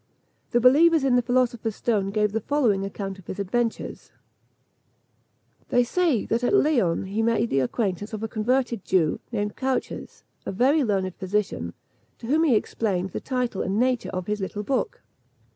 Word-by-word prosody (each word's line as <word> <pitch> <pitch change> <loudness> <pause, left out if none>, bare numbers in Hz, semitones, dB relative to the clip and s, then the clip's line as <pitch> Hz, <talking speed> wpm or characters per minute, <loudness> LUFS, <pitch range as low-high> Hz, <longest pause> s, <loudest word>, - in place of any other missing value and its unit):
The 240 - +2
believers 305 +5 +5
in 265 -2 +3
the 245 - +4
philosopher's 240 -3 0
stone 205 -5 0
give 210 0 +1
the 225 +1 -1
following 230 -8 +1
account 195 -1 -5
of 185 - -16
his - - -5
adventures: 225 +4 -2 1.6
They 245 - +4
say 305 - +1
that 230 +2 -1
at 245 - +3
Leon 255 - +2
he 200 +3 -2
made 230 0 +1
the 135 - +3
acquaintance 195 - -2
of 215 -1 -5
a - - -1
converted 235 0 0
Jew, 165 -5 +1
named 210 -2 -2
Cauches, 265 -1 -3 0.2
a - - -4
very 270 +9 +3
learned 190 -5 0
physician, 185 - -2 0.4
to - - -10
whom 310 +7 +2
he 265 -7 +4
explained 195 -4 -1
the - - -4
title 250 -6 -2
and 195 +2 -1
nature 250 -1 +1
of 185 -1 -4
his 210 +1 -2
little 205 +2 -4
book. 255 +4 -2
225 Hz, 170 wpm, -25 LUFS, 195-250 Hz, 1.6 s, believers